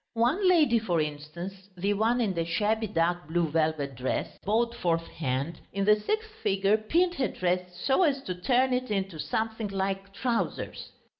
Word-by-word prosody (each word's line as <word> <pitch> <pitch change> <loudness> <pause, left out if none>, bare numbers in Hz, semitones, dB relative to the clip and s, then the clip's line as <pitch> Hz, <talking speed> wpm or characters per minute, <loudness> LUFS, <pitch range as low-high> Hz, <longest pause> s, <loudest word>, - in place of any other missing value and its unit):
One 285 - +3
lady, 300 -10 +5
for 180 -7 0
instance, 170 +6 -5
the 200 +3 +1
one 225 +4 +2
in 210 -5 +1
the 170 -2 0
shabby 215 +6 0
dark 175 -2 0
blue 170 +1 +1
velvet 155 -3 0
dress, 130 +1 -2
bought 230 +3 +1
fourth 170 -7 0
hand, 140 +2 -3
in 195 0 0
the 210 +1 +7
sixth 435 - -2
figure 195 +2 +3
pinned 335 +12 +2
her 275 -7 0
dress 180 -1 -1
so 270 +5 +3
as 280 -6 +2
to 185 - -3
turn 250 +8 +2
it 255 0 -1
into 195 -5 -2
something 220 +8 -2
like 195 0 -2
trousers. 235 +3 -2
195 Hz, 170 wpm, -28 LUFS, 170-235 Hz, -, the